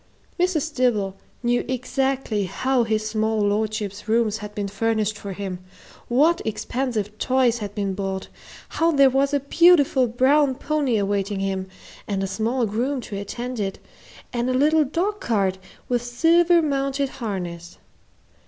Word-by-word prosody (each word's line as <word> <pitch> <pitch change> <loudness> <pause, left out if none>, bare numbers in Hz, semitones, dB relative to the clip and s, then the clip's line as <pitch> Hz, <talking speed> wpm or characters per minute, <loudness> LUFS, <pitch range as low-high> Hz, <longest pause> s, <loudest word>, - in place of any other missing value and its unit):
Mrs. 325 -4 0
Dibble 215 -8 +1 0.3
knew 240 0 +2
exactly 260 -4 -1
how 255 +6 +1
his 215 -1 -1
small 220 0 0
lordship's 210 0 -1
rooms 220 -1 +2
had 210 0 -8
been 205 -1 -2
furnished 215 +1 0
for 200 -1 -7
him, 190 -2 -5 0.5
what 305 +8 +3
expensive 220 -1 -2
toys 255 -2 +2
had 205 -1 -6
been 200 -2 -1
bought, 190 0 -4 0.4
how 330 +1 +1
there 275 -3 +5
was 275 +2 +2
a 285 - +2
beautiful 285 -3 +4
brown 265 +4 +3
pony 285 -5 0
awaiting 200 0 -1
him, 190 -1 -2 0.4
and 195 -1 -1
a - - 0
small 225 +6 0
groom 245 +6 -1
to 215 - -7
attend 240 +5 -5
it, 195 -2 -2 0.6
and 240 +1 0
a 255 - +1
little 305 +3 +4
dog 370 +9 -1
cart, 195 -5 0 0.3
with 245 -1 0
silver 335 +8 +3
mounted 275 -1 0
harness. 175 -5 -5
235 Hz, 145 wpm, -23 LUFS, 205-270 Hz, 0.6 s, there